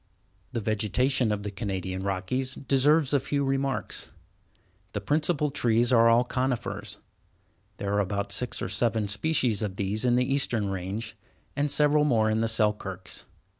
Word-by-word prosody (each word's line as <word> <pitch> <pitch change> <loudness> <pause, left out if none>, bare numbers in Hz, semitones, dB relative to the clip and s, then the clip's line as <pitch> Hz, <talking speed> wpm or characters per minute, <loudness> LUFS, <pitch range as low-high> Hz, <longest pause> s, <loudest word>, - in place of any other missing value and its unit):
The 120 - -2
vegetation 110 +4 +1
of 105 -1 -2
the 105 - -4
Canadian 95 -3 -4
Rockies 100 +8 -2
deserves 140 +2 +2
a 140 - +4
few 140 +1 -1
remarks. 135 0 -1 0.8
The 105 - -2
principal 150 - 0
trees 120 -2 +2
are 115 -1 +6
all 115 +1 +5
conifers. 115 -5 -3 0.8
There 100 0 -3
are 100 - +2
about 100 +1 -2
six 120 +5 -1
or - - -1
seven 110 -3 +1
species 115 +1 +1
of 100 -3 -3
these 100 +3 -1
in 120 -1 +3
the 125 0 +2
eastern 125 -6 0
range, 100 +4 -4 0.4
and 145 +1 0
several 150 +1 +3
more 110 -7 +2
in 110 +1 +1
the 115 - +1
Selkirks. 105 -4 -1
115 Hz, 155 wpm, -27 LUFS, 100-135 Hz, 0.8 s, are